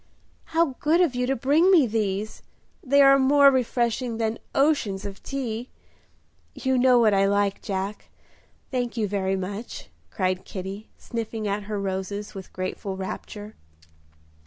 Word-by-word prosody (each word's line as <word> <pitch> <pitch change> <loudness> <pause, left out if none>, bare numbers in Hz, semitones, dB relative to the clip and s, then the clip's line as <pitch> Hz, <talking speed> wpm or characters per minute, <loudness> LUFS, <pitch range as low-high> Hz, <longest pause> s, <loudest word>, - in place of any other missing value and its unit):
"How 325 -4 +1
good 320 +3 +3
of 345 -7 +3
you 250 0 -1
to 270 - +1
bring 290 +9 +3
me 345 -8 +6
these! 215 -1 -2 0.4
They 280 +1 +5
are 275 0 +7
more 280 +1 +6
refreshing 240 -2 0
than 225 0 -1 0.2
oceans 250 -9 +1
of 200 -1 -7
tea. 245 -3 -4 0.9
You 260 -1 0
know 250 0 +5
what 225 -3 +4
I 195 0 +3
like, 200 0 +1
Jack; 195 +1 -4 0.6
thank 245 -2 -2
you 215 -2 +1
very 195 -1 -1
much" 200 +4 -6 0.2
cried 185 -2 -1
Kitty, 195 +3 -7
sniffing 225 -2 -4
at 200 0 -2
her 210 -1 -2
roses 195 +1 -4
with 190 -2 -9
grateful 190 +1 -4
rapture. 205 +2 -7
220 Hz, 145 wpm, -25 LUFS, 200-260 Hz, 0.9 s, are